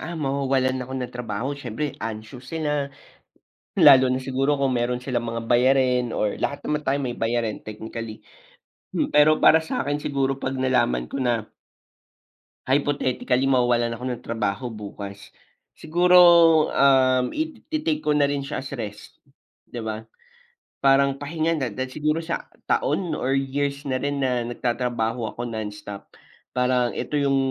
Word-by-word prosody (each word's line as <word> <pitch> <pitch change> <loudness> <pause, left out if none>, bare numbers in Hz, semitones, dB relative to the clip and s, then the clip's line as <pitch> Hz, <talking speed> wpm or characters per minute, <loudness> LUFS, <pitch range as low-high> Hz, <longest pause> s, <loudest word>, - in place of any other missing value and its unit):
ah, 170 +2 -6
mawawalan 135 -3 0
ako 130 +1 -7
ng 125 -1 -4
trabaho 125 +2 -3
siyempre 140 +1 -4
anxious 110 +4 -7
sila. 150 -3 -1 0.9
Lalo 130 -3 +7
na 130 - +1
siguro 135 +2 0
kung 135 -1 +1
meron 125 0 -1
silang 120 -3 -2
mga 115 0 -4
bayarin 125 0 +2
or 105 -1 0
lahat 145 - -2
naman 150 0 -1
tayo 140 -1 +1
may 130 -3 -2
bayarin 115 -1 -2
technically. 110 +1 -8 0.7
Hmm, 295 - 0
pero 150 +1 +6
para 160 - +6
sa'kin 145 -2 -2
siguro 135 -1 -1
'pag 130 0 -3
nalaman 125 - +1
ko 135 - -2
na 120 -4 0 1.2
hypothetically 135 -1 +1
mawawalan 120 -3 +2
ako 125 - -8
ng 120 - -6
trabaho 115 +1 -2
bukas, 100 -3 -8 0.5
siguro, 180 +3 +4 0.6
um, 130 -2 +4
it 315 +1 -4
i-take 310 0 -1
ko - - 0
na 150 -1 +3
rin 140 -1 -2
siya 140 - -4
as 135 +1 -6
rest, 105 -4 -8 0.5
di 120 - -6
ba? 110 -1 -4 0.8
Parang 140 0 +4
pahinga 155 +4 -2
na 135 -6 -1
dahil 130 +4 -5
siguro 155 +1 0
sa 165 0 -4 0.2
taon 195 - 0
or 135 +2 0
years 140 +1 -2
na 130 -2 -1
rin 145 0 -1
na 125 -2 0
nagtatrabaho 120 -2 -2
ako 120 - -3
nonstop, 105 -3 -7 0.4
parang 125 -1 0
eto - - -5
'yung 140 -2 +2
130 Hz, 150 wpm, -24 LUFS, 120-140 Hz, 1.2 s, Lalo